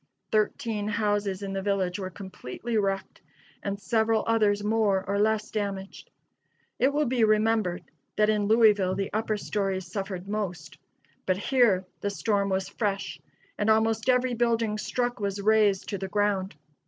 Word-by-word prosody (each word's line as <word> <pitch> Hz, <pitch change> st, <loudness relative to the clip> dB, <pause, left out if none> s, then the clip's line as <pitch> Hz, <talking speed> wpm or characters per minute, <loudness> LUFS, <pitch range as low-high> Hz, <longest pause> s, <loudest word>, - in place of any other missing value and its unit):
Thirteen 215 Hz, 0 st, 0 dB
houses 205 Hz, -2 st, 0 dB
in 195 Hz, -1 st, -4 dB
the 195 Hz, -, -2 dB
village 190 Hz, -2 st, -1 dB
were 185 Hz, -1 st, -4 dB
completely 190 Hz, -, -6 dB
wrecked, 195 Hz, -2 st, -1 dB, 0.4 s
and 200 Hz, 0 st, -3 dB
several 220 Hz, +1 st, +1 dB
others 210 Hz, -3 st, +2 dB
more 210 Hz, -3 st, +1 dB
or 200 Hz, +1 st, 0 dB
less 215 Hz, 0 st, +1 dB
damaged. 200 Hz, -2 st, -4 dB, 0.7 s
It 265 Hz, +3 st, +4 dB
will 295 Hz, +1 st, +1 dB
be 245 Hz, -1 st, +1 dB
remembered 215 Hz, -4 st, +2 dB, 0.3 s
that 210 Hz, -, +3 dB
in 210 Hz, -1 st, +1 dB
Louisville 210 Hz, -4 st, +4 dB
the 195 Hz, -1 st, -3 dB
upper 215 Hz, 0 st, 0 dB
stories 195 Hz, -3 st, -2 dB
suffered 195 Hz, -3 st, -5 dB
most: 180 Hz, -7 st, -4 dB, 0.5 s
but 185 Hz, -1 st, +2 dB
here 210 Hz, -5 st, +3 dB
the 205 Hz, -, -1 dB
storm 200 Hz, -1 st, 0 dB
was 190 Hz, 0 st, -1 dB
fresh, 200 Hz, -3 st, -3 dB, 0.4 s
and 205 Hz, +1 st, +1 dB
almost 220 Hz, +2 st, +2 dB
every 250 Hz, 0 st, +3 dB
building 230 Hz, -2 st, +1 dB
struck 245 Hz, +2 st, -2 dB
was 200 Hz, -1 st, -2 dB
razed 205 Hz, -2 st, +3 dB
to 200 Hz, -, -3 dB
the 190 Hz, -, -3 dB
ground. 200 Hz, -2 st, 0 dB
205 Hz, 155 wpm, -27 LUFS, 195-220 Hz, 0.7 s, It